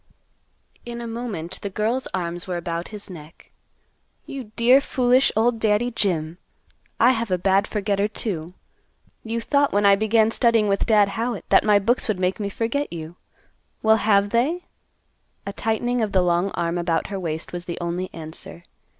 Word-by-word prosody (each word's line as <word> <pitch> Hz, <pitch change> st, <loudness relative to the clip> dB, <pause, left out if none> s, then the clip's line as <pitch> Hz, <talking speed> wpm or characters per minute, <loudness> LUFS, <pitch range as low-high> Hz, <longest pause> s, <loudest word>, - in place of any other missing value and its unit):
In 235 Hz, 0 st, -7 dB
a 235 Hz, -, -6 dB
moment 225 Hz, -7 st, -5 dB
the 200 Hz, -, -4 dB
girl's 220 Hz, +6 st, -1 dB
arms 175 Hz, -1 st, -4 dB
were 180 Hz, -1 st, -2 dB
about 170 Hz, 0 st, -4 dB
his 210 Hz, -1 st, -7 dB
neck, 165 Hz, -4 st, -13 dB, 0.7 s
"You 270 Hz, -3 st, -7 dB
dear 250 Hz, +4 st, +5 dB
foolish 255 Hz, -1 st, +3 dB
old 230 Hz, +1 st, +2 dB
Daddy 220 Hz, +2 st, +1 dB
Jim. 175 Hz, -7 st, -1 dB, 0.6 s
I 240 Hz, +3 st, +6 dB
have 230 Hz, -3 st, -2 dB
a 185 Hz, -, +1 dB
bad 195 Hz, +3 st, +2 dB
forgetter, 205 Hz, -1 st, 0 dB
too. 180 Hz, -5 st, -4 dB, 0.7 s
You 230 Hz, +1 st, -3 dB
thought 280 Hz, +4 st, +1 dB
when 205 Hz, 0 st, +2 dB
I 200 Hz, 0 st, +7 dB
began 220 Hz, +2 st, +2 dB
studying 230 Hz, -3 st, +3 dB
with 200 Hz, -1 st, 0 dB
Dad 210 Hz, -3 st, +4 dB
Howitt 230 Hz, +1 st, -3 dB
that -, -, +5 dB
my 210 Hz, -1 st, +5 dB
books 230 Hz, +5 st, +1 dB
would 210 Hz, -5 st, -1 dB
make 185 Hz, +2 st, 0 dB
me 200 Hz, -1 st, -2 dB
forget 235 Hz, +8 st, -2 dB
you. 165 Hz, 0 st, -7 dB, 0.7 s
Well, 220 Hz, 0 st, +5 dB
have 205 Hz, -1 st, +2 dB
they?" 295 Hz, +10 st, 0 dB, 0.8 s
A 200 Hz, -, -5 dB
tightening 240 Hz, +3 st, -1 dB
of 215 Hz, -2 st, -1 dB
the 185 Hz, -2 st, +4 dB
long 175 Hz, +2 st, +1 dB
arm 170 Hz, +1 st, -1 dB
about 170 Hz, -1 st, 0 dB
her 195 Hz, -, -3 dB
waist 160 Hz, -2 st, -4 dB
was 175 Hz, 0 st, -5 dB
the 170 Hz, -2 st, -5 dB
only 175 Hz, +2 st, -3 dB
answer. 165 Hz, +1 st, -10 dB
205 Hz, 175 wpm, -23 LUFS, 180-230 Hz, 0.8 s, I